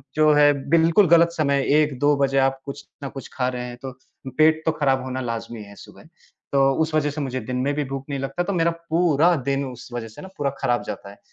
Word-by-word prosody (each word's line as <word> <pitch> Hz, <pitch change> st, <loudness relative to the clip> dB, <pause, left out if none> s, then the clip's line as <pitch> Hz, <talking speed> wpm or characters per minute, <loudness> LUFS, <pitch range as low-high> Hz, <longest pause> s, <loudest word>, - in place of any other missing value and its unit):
जो 155 Hz, 0 st, +4 dB
है, 145 Hz, 0 st, +6 dB, 0.2 s
बिल्कुल 165 Hz, +4 st, +4 dB
गलत 170 Hz, 0 st, +5 dB
समय 140 Hz, -4 st, 0 dB, 0.2 s
1-2 145 Hz, 0 st, +1 dB
बजे 135 Hz, -1 st, +1 dB
आप 135 Hz, 0 st, +1 dB
कुछ 140 Hz, 0 st, -8 dB, 0.2 s
न -, -, -4 dB
कुछ 135 Hz, -, -9 dB
खा 125 Hz, -1 st, -1 dB
रहे 125 Hz, -1 st, -5 dB
हैं 120 Hz, 0 st, -8 dB
तो 130 Hz, -, -5 dB, 0.5 s
पेट 155 Hz, 0 st, +4 dB
तो 160 Hz, -, +3 dB
ख़राब 135 Hz, -2 st, +1 dB
होना 130 Hz, 0 st, -4 dB
लाज़मी 115 Hz, -2 st, -5 dB
है 100 Hz, 0 st, -14 dB
सुबह। -, -, -15 dB, 0.5 s
तो 135 Hz, 0 st, +4 dB
उस 160 Hz, 0 st, -1 dB
वज़ह 145 Hz, -1 st, +1 dB
से 150 Hz, -, -5 dB
मुझे 130 Hz, -2 st, -3 dB
दिन 125 Hz, +3 st, -4 dB
में 145 Hz, -, +1 dB
भी 150 Hz, -, -1 dB
भूख 135 Hz, 0 st, -6 dB
नहीं 140 Hz, -1 st, -3 dB
लगता 135 Hz, +6 st, -3 dB
तो 200 Hz, +2 st, -3 dB
मेरा 170 Hz, -1 st, +2 dB, 0.2 s
पूरा 170 Hz, 0 st, +3 dB
दिन 140 Hz, 0 st, 0 dB
उस 125 Hz, -2 st, -9 dB
वज़ह 120 Hz, -2 st, -4 dB
से 110 Hz, -, -12 dB
न 190 Hz, -, -9 dB
पूरा 140 Hz, -1 st, 0 dB
खराब 120 Hz, -3 st, 0 dB
जाता 100 Hz, -, -7 dB
है, 100 Hz, -, -15 dB
140 Hz, 240 wpm, -22 LUFS, 130-155 Hz, 0.5 s, है